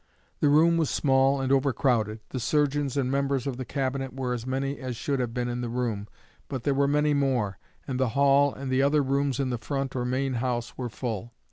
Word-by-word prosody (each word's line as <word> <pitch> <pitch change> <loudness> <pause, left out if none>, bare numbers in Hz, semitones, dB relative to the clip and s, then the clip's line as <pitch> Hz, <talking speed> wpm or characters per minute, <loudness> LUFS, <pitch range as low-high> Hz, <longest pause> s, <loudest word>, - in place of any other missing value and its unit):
The 145 - +3
room 165 +3 +5
was 160 -3 +1
small 135 0 +3
and 135 0 -1
overcrowded. 125 -5 +1
The 130 - -4
surgeons 145 +1 +1
and 130 -2 0
members 140 -1 0
of 135 -3 -3
the 130 - -4
Cabinet 135 -1 -2
were 130 -2 -2
as 120 0 -5
many 135 +2 -2
as 130 -3 -4
should 140 +4 -2
have 120 -2 -1
been 120 0 -2
in 120 0 -3
the 120 - -3
room, 115 -4 -2 0.4
but 130 -4 -5
there 140 - +2
were 140 +1 +2
many 150 +1 +2
more, 125 -9 0 0.3
and 130 -2 -2
the 130 -2 +2
hall 140 0 +5
and 135 -1 -5
other 145 +1 +3
rooms 140 0 0
in 130 -2 0
the 120 - -2
front 135 +3 -3
or 125 - -1
main 130 +2 -1
house 120 -2 -2
were 125 -2 -4
full. 115 -1 -5
135 Hz, 220 wpm, -27 LUFS, 125-140 Hz, 0.4 s, room